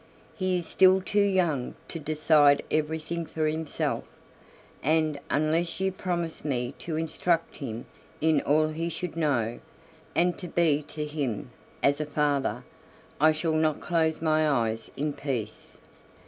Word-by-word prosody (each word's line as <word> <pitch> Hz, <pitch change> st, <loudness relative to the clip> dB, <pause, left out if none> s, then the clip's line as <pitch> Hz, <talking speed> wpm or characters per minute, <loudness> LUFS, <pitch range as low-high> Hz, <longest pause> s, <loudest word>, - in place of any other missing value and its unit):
He 185 Hz, -2 st, 0 dB
is 175 Hz, -, -3 dB
still 190 Hz, +2 st, +5 dB
too 205 Hz, +2 st, +1 dB
young 180 Hz, -10 st, +1 dB
to 165 Hz, -, -5 dB
decide 150 Hz, -1 st, +4 dB
everything 160 Hz, +2 st, -1 dB
for 160 Hz, -1 st, -2 dB
himself, 155 Hz, 0 st, -1 dB, 0.8 s
and 155 Hz, 0 st, +1 dB
unless 160 Hz, +4 st, +1 dB
you 190 Hz, 0 st, +1 dB
promise 175 Hz, -3 st, -3 dB
me 125 Hz, -3 st, -1 dB
to 165 Hz, -, -4 dB
instruct 165 Hz, +1 st, 0 dB
him 120 Hz, -5 st, -5 dB, 0.3 s
in 155 Hz, -2 st, +3 dB
all 155 Hz, +2 st, +3 dB
he 165 Hz, +2 st, -3 dB
should 170 Hz, 0 st, -5 dB
know, 130 Hz, -8 st, 0 dB, 0.6 s
and 175 Hz, 0 st, +2 dB
to 180 Hz, -, -6 dB
be 160 Hz, -3 st, +2 dB
to 150 Hz, -1 st, -4 dB
him 145 Hz, -4 st, -3 dB, 0.3 s
as 140 Hz, +2 st, +3 dB
a 150 Hz, -, -3 dB
father, 145 Hz, -2 st, 0 dB, 0.6 s
I 155 Hz, +2 st, +6 dB
shall 155 Hz, +1 st, -1 dB
not 155 Hz, -1 st, +2 dB
close 160 Hz, -2 st, 0 dB
my 155 Hz, -1 st, +3 dB
eyes 115 Hz, -5 st, 0 dB
in 150 Hz, +1 st, -1 dB
peace." 120 Hz, -8 st, -5 dB
155 Hz, 145 wpm, -27 LUFS, 145-165 Hz, 0.8 s, I